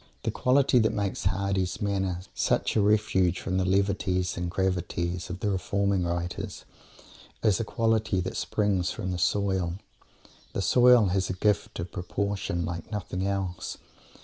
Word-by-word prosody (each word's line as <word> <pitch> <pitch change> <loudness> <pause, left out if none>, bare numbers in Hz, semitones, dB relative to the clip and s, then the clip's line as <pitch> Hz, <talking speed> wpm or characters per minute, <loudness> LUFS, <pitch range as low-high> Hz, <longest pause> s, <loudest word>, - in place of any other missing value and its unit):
The - - 0
quality 130 0 +3
that 110 -1 +2
makes 100 -2 -1
Mr. - - +5
Hardy's 95 -1 -1
manner 95 -3 -1
such - - +1
a 110 - +4
refuge 95 -4 +2
from 95 -1 -2
the 95 - +1
levities 95 -1 +1
and 85 0 -3
gravities 90 -1 -1
of 90 +1 -6
the 105 - +1
"reforming 100 -1 0
writers" 85 0 -4 0.8
is 105 -4 +3
a - - 0
quality 110 -3 +1
that 90 - -4
springs 100 -4 0
from 95 -4 -3
the 90 - -3
soil. 95 -2 +1 0.8
The - - -1
soil 125 -4 +6
has 95 +1 0
a - - 0
gift 100 0 0
of 85 +1 -5
"proportion" 95 -2 -2
like 85 +3 -6
nothing 95 -2 -3
else. 95 -3 -3
95 Hz, 155 wpm, -27 LUFS, 90-100 Hz, 0.8 s, soil